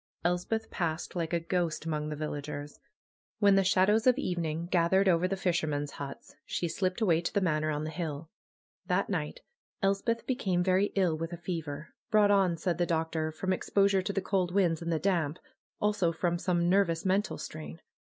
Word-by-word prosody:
Elspeth 180 +6 -1
passed 165 0 -2
like 165 -2 -2
a 170 - +1
ghost 170 -2 -1
among 150 -1 -2
the 150 - -3
villagers. 145 -1 -5 0.6
When 205 -2 +5
the 195 0 +4
shadows 205 +5 +3
of 255 0 +5
evening 170 - -2
gathered 185 +2 +3
over 180 0 +3
the 195 +1 -2
fisher 175 -4 0
men's 145 -1 -2
huts 140 -1 -8
she 170 - -2
slipped 185 +5 -1
away 170 -6 +3
to 170 - -2
the - - +2
Manor 155 -4 +1
on 150 0 -1
the 155 - -4
hill. 160 -2 -5 0.6
That - - +1
night - - -3 0.4
Elspeth 200 +4 +1
became 190 -9 0
very 190 +2 +3
ill 185 -5 +2
with 165 +2 -4
a - - -5
fever; 160 -3 -5 0.2
brought 210 -2 +5
on, 190 -4 +3
said 170 +1 -1
the 175 - +2
doctor, 160 -1 -1
"from 185 +4 -1
exposure 195 +1 +2
to 190 - -2
the 195 - 0
cold 185 -2 0
winds 175 -5 +2
and 170 0 -2
the 165 - +2
damp; 165 -4 0 0.4
also 205 -5 +2
from 170 +1 -1
some 175 -2 +1
nervous 175 -3 +2
mental 195 +2 +1
strain." 80 +1 -8
175 Hz, 190 wpm, -30 LUFS, 160-195 Hz, 0.6 s, When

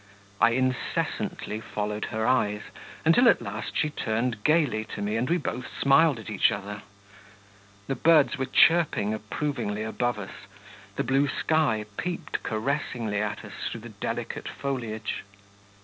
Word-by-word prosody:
I 115 0 +5
incessantly 130 -4 -1
followed 105 -1 -3
her 110 0 -2
eyes, 105 -5 +2 0.4
until 230 +10 +6
at - - +4
last 105 +3 -5
she 150 - +1
turned 115 -4 -1
gaily 150 -9 +3
to - - -6
me 105 +1 -1
and 120 +5 0
we 175 - +3
both 125 -7 -4
smiled 140 +1 +5
at 110 - -10
each - - +3
other. 105 +1 -5 1.0
The 135 - -1
birds 150 +2 +4
were 130 -1 -2
chirping 155 -13 +4
approvingly 110 -1 -3
above 120 +1 -1
us, 95 -2 -9 0.5
the - - 0
blue 135 +2 +2
sky 140 -7 +1
peeped 175 -3 -3
caressingly 110 -3 -1
at 105 -1 -3
us - - -10 0.2
through - - -6
the - - -9
delicate - - -4
foliage. 115 -6 -3
120 Hz, 145 wpm, -27 LUFS, 110-145 Hz, 1.0 s, until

